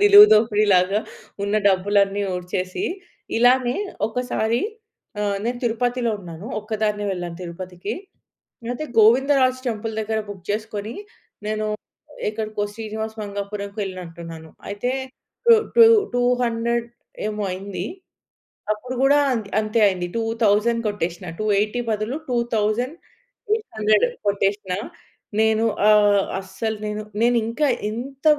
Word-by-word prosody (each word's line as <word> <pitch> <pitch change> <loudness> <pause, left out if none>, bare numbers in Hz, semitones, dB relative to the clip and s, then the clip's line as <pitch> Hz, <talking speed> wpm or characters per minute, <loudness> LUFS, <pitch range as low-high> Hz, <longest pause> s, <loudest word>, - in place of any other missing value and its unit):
నిలువు 410 0 +10
దోపిడీ 215 -1 +4
లాగా, 185 +3 +3 0.4
ఉన్న 200 +1 -1
డబ్బులన్నీ 200 +1 +2
ఊడ్చేసి, 180 - -3 0.5
ఇలానే 245 +1 +4 0.3
ఒకసారి 235 -1 0 0.6
ఆహ్, 205 -1 0
నేను 240 +1 -1
తిరుపతిలో 240 +1 0
ఉన్నాను. 175 +1 -9
ఒక్కదాన్నే 210 -1 -1
వెళ్ళాను 175 -2 -5
తిరుపతికి. 180 +2 -6 0.8
అయితే 250 +5 -3
గోవిందరాజ్ 255 +3 +5
టెంపుల్ 225 -1 -2
దగ్గర 220 0 -1
బుక్ 195 -3 -9
చేసుకొని, 215 +1 -3 0.5
నేను 215 0 -1 0.6
ఎక్కడికో 215 -1 -3
శ్రీనివాస 220 0 -4
మంగాపురం‌కి 200 0 -5
వెళ్ళినట్టున్నాను. 170 -4 -7 0.2
అయితే 205 +5 -2 0.6
టూ 470 - +9 0.2
టూ 465 - +10 0.3
టూ 245 - +2 0.2
హండ్రెడ్ 235 0 0 0.4
ఏమో 210 -1 -3
అయింది. 185 0 -4 0.9
అప్పుడు 250 +4 -6
కూడా 280 +2 +5 0.4
అంతే 215 +1 0
అయింది. 180 -2 0
2000 225 0 +2
కొట్టేసినా. 180 -3 -3
280 215 +2 +1
బదులు 215 +5 -1
2800 240 - -1 0.2
కొట్టేసినా. 200 -1 0 0.6
నేను 220 0 +3 0.2
ఆహ్, 205 -2 +5 0.2
అస్సలు 220 +3 -4
నేను, 210 0 -3 0.2
నేనింకా 235 +4 +2 0.2
ఇంత 265 +6 -7
215 Hz, 105 wpm, -22 LUFS, 200-235 Hz, 0.9 s, నిలువు